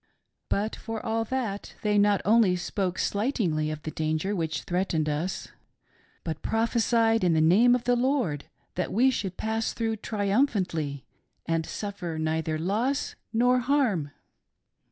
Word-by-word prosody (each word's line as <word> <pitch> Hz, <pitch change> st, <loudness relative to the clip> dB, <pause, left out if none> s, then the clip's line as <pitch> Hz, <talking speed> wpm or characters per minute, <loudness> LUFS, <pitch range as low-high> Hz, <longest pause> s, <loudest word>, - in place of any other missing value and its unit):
But, 210 Hz, +2 st, 0 dB
for 225 Hz, 0 st, -5 dB
all 225 Hz, 0 st, 0 dB
that, 225 Hz, -5 st, -3 dB
they 210 Hz, -1 st, +3 dB
not 205 Hz, -1 st, +3 dB
only 215 Hz, -3 st, +5 dB
spoke 185 Hz, +1 st, -2 dB
slightingly 200 Hz, -, 0 dB
of 155 Hz, -1 st, -5 dB
the 155 Hz, -, -4 dB
danger 155 Hz, +6 st, -1 dB
which 160 Hz, -5 st, -2 dB
threatened 175 Hz, -4 st, 0 dB
us, 155 Hz, +5 st, -2 dB, 0.7 s
but 160 Hz, -2 st, -4 dB
prophesied 225 Hz, -1 st, +2 dB
in 175 Hz, -2 st, +3 dB
the 160 Hz, -, +3 dB
name 205 Hz, +10 st, +5 dB
of 245 Hz, -, -2 dB
the 245 Hz, -, +3 dB
Lord, 245 Hz, -, 0 dB, 0.3 s
that 180 Hz, -, -2 dB
we 255 Hz, +5 st, +4 dB
should 195 Hz, -7 st, -3 dB
pass 220 Hz, +1 st, -1 dB
through 225 Hz, -1 st, -1 dB
triumphantly 200 Hz, -, 0 dB, 0.4 s
and 165 Hz, -1 st, -1 dB
suffer 185 Hz, -6 st, -5 dB
neither 160 Hz, 0 st, -1 dB
loss 220 Hz, -, -1 dB, 0.2 s
nor 245 Hz, +2 st, +3 dB
harm. 245 Hz, -, +1 dB
200 Hz, 140 wpm, -27 LUFS, 165-230 Hz, 0.7 s, only